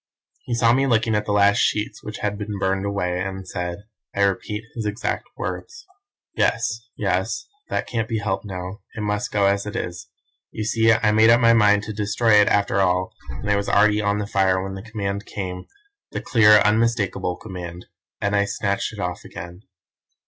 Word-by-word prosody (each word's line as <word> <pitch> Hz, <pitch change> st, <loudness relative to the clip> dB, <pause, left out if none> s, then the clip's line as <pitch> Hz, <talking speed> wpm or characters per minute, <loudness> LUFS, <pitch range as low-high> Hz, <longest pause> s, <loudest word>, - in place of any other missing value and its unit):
"He 120 Hz, -, -1 dB
saw 115 Hz, -1 st, +4 dB
me 135 Hz, +2 st, +2 dB
looking 115 Hz, -2 st, +2 dB
at 105 Hz, 0 st, 0 dB
the -, -, 0 dB
last 100 Hz, +1 st, +4 dB
sheets, 105 Hz, 0 st, 0 dB
which 105 Hz, -, -6 dB
had 105 Hz, -1 st, -1 dB
been 105 Hz, 0 st, -5 dB
burned 95 Hz, +1 st, 0 dB
away, 90 Hz, -3 st, -1 dB
and 95 Hz, 0 st, -4 dB
said 90 Hz, +1 st, -4 dB, 0.3 s
(I 100 Hz, -, +2 dB
repeat 105 Hz, +2 st, -1 dB
his 110 Hz, -3 st, -3 dB
exact 105 Hz, +2 st, -2 dB
words) 370 Hz, 0 st, -6 dB, 0.5 s
"'Yes, 115 Hz, 0 st, 0 dB
yes, 95 Hz, +2 st, -1 dB, 0.2 s
that -, -, -1 dB
can't 115 Hz, -2 st, -3 dB
be 115 Hz, -, 0 dB
helped 105 Hz, -2 st, -2 dB
now, 95 Hz, 0 st, -6 dB, 0.2 s
it 110 Hz, -, -4 dB
must 105 Hz, +3 st, -2 dB
go 100 Hz, -1 st, +2 dB
as 100 Hz, +1 st, +1 dB
it 105 Hz, -, -6 dB
is. 90 Hz, 0 st, -4 dB, 0.4 s
You 110 Hz, -, -5 dB
see 110 Hz, +1 st, +3 dB
I 110 Hz, -1 st, +3 dB
made 110 Hz, +1 st, +5 dB
up 115 Hz, +1 st, +6 dB
my 115 Hz, -1 st, +5 dB
mind 105 Hz, -2 st, +4 dB
to 110 Hz, -, -5 dB
destroy 105 Hz, +2 st, +1 dB
it 105 Hz, -, +3 dB
after 100 Hz, -1 st, +2 dB
all, 90 Hz, 0 st, +1 dB, 0.2 s
and 65 Hz, -, -6 dB
it 105 Hz, -, +3 dB
was 100 Hz, 0 st, -1 dB
already 105 Hz, +1 st, +4 dB
on 100 Hz, 0 st, +1 dB
the 105 Hz, -, -2 dB
fire 95 Hz, -2 st, +1 dB
when 95 Hz, 0 st, -5 dB
the 95 Hz, -, -6 dB
command 100 Hz, -2 st, -4 dB
came 90 Hz, -2 st, -5 dB, 0.4 s
the -, -, -3 dB
clear, 105 Hz, -3 st, +6 dB
unmistakable 105 Hz, -4 st, +1 dB
command 90 Hz, -3 st, -8 dB, 0.3 s
and 100 Hz, 0 st, 0 dB
I 100 Hz, 0 st, +3 dB
snatched 100 Hz, +1 st, -2 dB
it 105 Hz, -, -9 dB
off 90 Hz, -3 st, -3 dB
again. 85 Hz, +2 st, -9 dB
105 Hz, 195 wpm, -22 LUFS, 95-110 Hz, 0.5 s, up